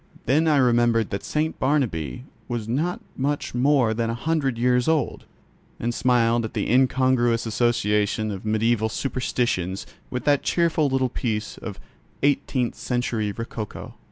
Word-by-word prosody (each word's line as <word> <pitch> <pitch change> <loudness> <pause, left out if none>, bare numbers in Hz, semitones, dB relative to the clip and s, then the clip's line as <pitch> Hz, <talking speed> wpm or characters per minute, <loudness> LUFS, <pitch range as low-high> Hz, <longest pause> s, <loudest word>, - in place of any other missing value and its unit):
Then 155 +5 +3
I 150 -2 +4
remembered 120 -3 +3
that 100 - -3
St. 155 +1 -1
Barnabķ 125 - 0 0.2
was 120 -3 -3
not 155 +10 -1
much 145 +2 -2
more 125 -2 +3
than 115 0 -1
a 115 - -1
hundred 140 -2 0
years 125 +2 +2
old, 160 -2 0 0.5
and 120 +1 -1
smiled 120 -1 +2
at 110 - -6
the - - -1
incongruous 130 -2 +3
association 110 -2 +1
of 95 -2 -6
mediaeval 110 +1 +1
superstitions 120 -8 -1 0.2
with 125 - -4
that 145 -1 +3
cheerful 165 -3 +2
little 130 -1 +1
piece 110 -3 -3
of - - -7 0.4
eighteenth 135 -3 +1
century 120 -4 -2
rococo. 110 0 -6
120 Hz, 140 wpm, -24 LUFS, 110-135 Hz, 0.5 s, I